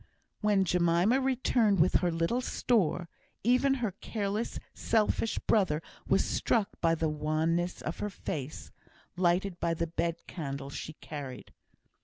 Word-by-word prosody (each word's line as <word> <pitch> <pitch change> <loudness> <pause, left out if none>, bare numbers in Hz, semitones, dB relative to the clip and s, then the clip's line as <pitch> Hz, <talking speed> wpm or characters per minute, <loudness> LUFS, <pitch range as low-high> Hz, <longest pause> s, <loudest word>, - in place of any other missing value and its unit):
When 205 -3 +3
Jemima 180 +8 +3
returned 245 -6 +2
with 170 +3 +5
her 175 -2 +1
little 165 +10 0
store, 195 -9 +1 0.4
even 255 +4 +4
her 235 -6 -1
careless, 210 +1 -2 0.2
selfish 220 0 +1
brother 185 -9 +2 0.3
was - - +3
struck 215 -4 +1
by 165 -1 +3
the 160 0 0
wanness 155 +3 0
of 155 - -4
her 210 - -2
face, 150 -6 -5 0.4
lighted 180 +1 +1
by 165 0 0
the 170 - -1
bed 170 +1 -2
candle 140 -4 -5
she 155 - -6
carried. 140 -5 -8
175 Hz, 135 wpm, -30 LUFS, 165-215 Hz, 0.4 s, with